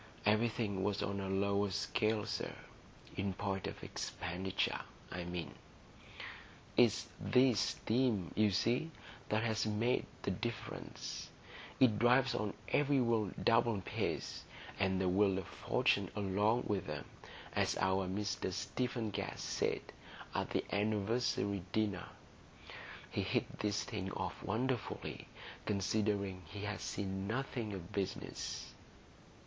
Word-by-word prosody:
Everything 105 -2 +2
was 100 +1 +1
on 100 0 -1
a 95 -1 -2
lower 100 +1 +2
scale, 105 +2 +1
sir,—in 100 -2 -5
point 95 -1 -1
of - - -7
expenditure, 90 +3 -1 0.3
I 90 -1 -3
mean. 85 -5 -4 1.2
It's 120 -1 +5
this 125 -4 +5
steam, 110 -4 +1
you 110 -1 +5
see, 120 - +2 0.4
that 110 +1 +2
has 110 -1 +1
made 110 +4 +2 0.2
the 100 - +1
difference; 115 +4 -4 0.5
it 115 -5 +6
drives 125 +3 +5
on 105 -1 -1
every 145 -1 +4
wheel 115 -5 +3
double 115 -2 +4
pace, - - -2 0.4
and 95 -1 +2
the 95 - +2
wheel 95 +1 +4
of 95 - -2
fortune - - +2
along 105 +4 +2
with 100 -6 -1
'em, 75 -2 -4 0.5
as - - +2
our 95 0 +2
Mr 100 0 -1
Stephen 120 +3 -1
Guest - - -3
said - - 0 0.5
at - - 0
the - - +1
anniversary 105 -1 +1
dinner 105 -5 0 1.0
(he - - 0
hits - - 0
these 105 -1 +1
things 95 -4 -3
off - - -3
wonderfully, 120 +3 -2 0.4
considering 100 -1 +1
he's 105 +4 -4
seen 95 -1 -2
nothing 120 -2 -2
of 90 -3 -6
business). 100 -2 -3
105 Hz, 120 wpm, -36 LUFS, 95-115 Hz, 1.2 s, it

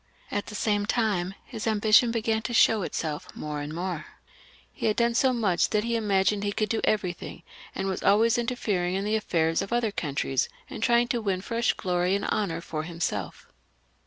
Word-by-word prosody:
At 205 - -2
the 210 - -7
same 205 -1 0
time 200 -6 0
his 220 - -6
ambition 220 +2 +5
began 225 -1 0
to 240 +2 -3
show 220 -1 +5
itself 160 -1 -3
more 150 -1 -4
and 145 +1 -5
more. 170 -1 -4 0.7
He - - -2
had 215 - +2
done 235 0 +2
so 260 +2 +3
much 205 -8 +1
that 210 -1 +1
he 235 0 -1
imagined 200 -2 +1
he 205 - 0
could 215 0 -1
do 225 - 0
everything, 180 -4 -2 0.3
and 195 - -2
was 190 - -2
always 225 +4 +4
interfering 205 -7 -1
in 195 +1 -1
the 210 - 0
afifairs 165 -6 +1
of 195 - -5
other 235 -2 +1
countries, 140 -6 -1 0.2
and - - -6
trying 240 0 +3
to 240 - 0
win 195 -3 -1
fresh 230 +3 0
glory 180 +1 0
and 200 - -2
honour 170 -6 -1
for 155 -2 -4
himself. 155 - -4
205 Hz, 190 wpm, -27 LUFS, 175-225 Hz, 0.7 s, ambition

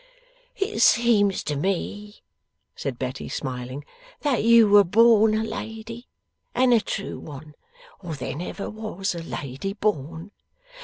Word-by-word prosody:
'It 395 +2 -2
seems 215 -5 +4
to 150 - -2
me,' 195 +6 -3 0.5
said 135 -4 -4
Betty, 130 +1 -5
smiling, 130 +1 -5 0.4
'that 275 -7 +1
you 230 -1 +7
were 205 0 +7
born 220 +2 +5
a 220 - 0
lady, 225 +2 -7 0.5
and 250 0 +4
a 230 - +4
true 200 - -5
one, 150 0 -10 0.5
or 170 -4 -6
there 135 - -5
never 180 +5 -5
was 215 -3 -4
a 170 - -6
lady 145 +3 -5
born. 170 -3 -3
200 Hz, 135 wpm, -24 LUFS, 150-225 Hz, 0.5 s, you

